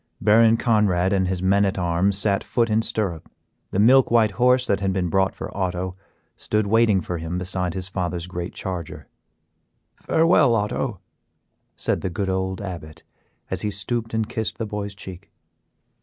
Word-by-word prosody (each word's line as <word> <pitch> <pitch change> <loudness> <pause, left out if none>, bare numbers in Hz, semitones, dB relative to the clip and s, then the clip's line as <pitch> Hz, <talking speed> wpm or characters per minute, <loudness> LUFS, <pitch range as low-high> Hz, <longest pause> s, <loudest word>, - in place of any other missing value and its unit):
Baron 115 +1 +5
Conrad 100 -6 +2
and 95 -1 +1
his 90 -1 -2
men 100 +2 +3
at 95 -1 0
arms 90 +2 +1
sat 100 -1 +1
foot 115 -2 0
in 110 +1 +3
stirrup, 105 -8 -3 0.4
the - - -4
milk 125 +6 +5
white 115 -3 +4
horse 125 +5 +3
that 100 - +1
had 95 -1 0
been 90 -2 -1
brought 95 +2 +1
for - - -7
Otto 90 -1 -2 0.4
stood 105 0 -1
waiting 110 -2 +3
for 85 +1 -4
him 80 +2 -4
beside 90 -1 -3
his 95 -1 -3
father's 90 -3 -3
great 90 0 -6
charger. 90 -4 -6 0.9
"Farewell, 160 -7 +3
Otto," 105 -1 -2 0.7
said - - -1
the 95 - -2
good 95 +3 -3
old 95 0 -2
Abbot, 85 -5 -8 0.5
as 95 0 -2
he 105 - -1
stooped 115 +3 -2
and 110 -1 0
kissed 110 -2 -3
the 115 - -3
boy's 105 -1 -5
cheek. 95 -2 -10
95 Hz, 170 wpm, -23 LUFS, 90-110 Hz, 0.9 s, Baron